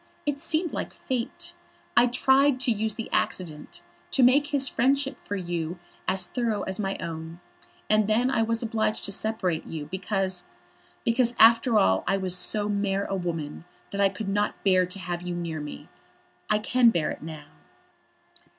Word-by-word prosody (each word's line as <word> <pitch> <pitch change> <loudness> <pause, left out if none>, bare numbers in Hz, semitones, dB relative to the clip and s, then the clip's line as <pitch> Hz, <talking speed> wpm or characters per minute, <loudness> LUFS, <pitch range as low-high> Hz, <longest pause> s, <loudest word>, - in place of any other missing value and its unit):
It 290 -1 -1
seemed 320 +2 0
like - - -4
Fate. 250 -3 -4 0.4
I 240 +1 +6
tried 265 +2 +3
to 250 - +2
use 220 -1 0
the 225 - -5
accident, 160 -5 -2 0.3
to 270 - +3
make 280 +4 +5
his 280 -2 +2
friendship 270 +3 +1
for 205 - -4
you 175 -2 -3 0.3
as 190 -1 +2
thorough 230 -3 -1
as 190 +1 -3
my 195 -1 -1
own. 165 0 -6 0.5
And 215 -1 +3
then 240 +4 +2
I 235 - +2
was 230 +1 0
obliged 220 -1 -1
to 200 - -2
separate 200 -5 -1
you, 155 -2 -5
because, 190 -1 -2 0.6
because, 235 0 +2
after 230 +1 +6
all 95 - +3
I 195 - +2
was 185 -2 0
so 205 +3 +1
mere 200 -1 0
a 195 - -2
woman 165 -5 -4 0.3
that 200 - -1
I 200 - +5
could 195 +2 -6
not 205 +1 -1
bear 185 -2 +4
to 180 +2 -4
have 175 -2 -4
you 175 0 -4
near 170 -2 -4
me. 150 0 -8 0.6
I 215 - +4
can 240 +3 +4
bear 170 -8 0
it - - -7
now." 155 -2 -9
205 Hz, 175 wpm, -26 LUFS, 180-235 Hz, 0.6 s, I